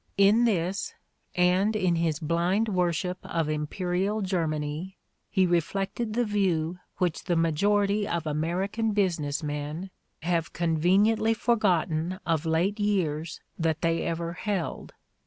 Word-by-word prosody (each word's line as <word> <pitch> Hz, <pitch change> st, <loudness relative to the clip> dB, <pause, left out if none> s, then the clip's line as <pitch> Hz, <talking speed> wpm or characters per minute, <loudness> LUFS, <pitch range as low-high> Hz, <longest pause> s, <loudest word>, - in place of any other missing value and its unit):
In 205 Hz, +4 st, +5 dB
this, 190 Hz, -3 st, -1 dB, 0.4 s
and 180 Hz, +4 st, +3 dB
in 185 Hz, -5 st, +2 dB
his 165 Hz, -2 st, +1 dB
blind 175 Hz, +7 st, +1 dB
worship 180 Hz, -1 st, 0 dB
of 165 Hz, -2 st, -1 dB
imperial 180 Hz, +7 st, -1 dB
Germany, 165 Hz, -1 st, -2 dB, 0.3 s
he 190 Hz, -2 st, +3 dB
reflected 195 Hz, +6 st, -1 dB
the 245 Hz, 0 st, +2 dB
view 180 Hz, -5 st, 0 dB, 0.2 s
which 180 Hz, -4 st, -1 dB
the 175 Hz, -, +1 dB
majority 200 Hz, +5 st, +2 dB
of 170 Hz, -1 st, -2 dB
American 185 Hz, +9 st, -1 dB
business 170 Hz, -7 st, 0 dB
men 150 Hz, +5 st, -4 dB, 0.3 s
have 170 Hz, -1 st, 0 dB
con 165 Hz, -1 st, 0 dB
veniently 210 Hz, +7 st, +3 dB
forgotten 185 Hz, -7 st, +1 dB
of 165 Hz, -1 st, 0 dB
late 175 Hz, +7 st, +1 dB
years 165 Hz, -6 st, -1 dB, 0.2 s
that 160 Hz, -1 st, 0 dB
they 165 Hz, 0 st, +2 dB
ever 170 Hz, 0 st, -2 dB
held. 195 Hz, -1 st, -3 dB
180 Hz, 125 wpm, -27 LUFS, 165-200 Hz, 0.4 s, In